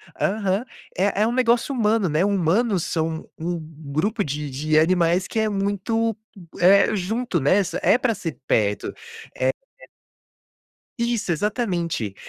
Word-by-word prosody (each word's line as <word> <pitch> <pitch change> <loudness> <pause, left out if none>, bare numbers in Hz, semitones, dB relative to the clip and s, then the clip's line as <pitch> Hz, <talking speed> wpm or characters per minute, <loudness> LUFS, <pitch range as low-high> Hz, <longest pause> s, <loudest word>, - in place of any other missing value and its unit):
Aham, 200 +2 0 0.3
é 200 +2 +1
é 220 - +4
um - - 0
negócio 245 +2 +2
humano, 220 -4 +2
né, 155 +4 +1
humanos 200 +1 +1
são 160 -1 -2
um 175 +2 -3
um 155 -2 -11
grupo 205 +8 0
de 145 0 -4
de 155 +4 0
animais 175 +2 +2
que 225 - -2
é 220 0 +1
muito, 205 +3 -1 0.4
é 200 +4 +5
junto, 210 +1 -1
né, 145 +8 +3 0.2
é - - +4
pra 245 -2 +1
ser 165 -5 -6
perto 105 -2 0 0.4
é, 130 0 +1
é. - - +1 1.5
Isso, 235 -6 0
exatamente, 170 - -1
190 Hz, 140 wpm, -23 LUFS, 160-220 Hz, 1.5 s, é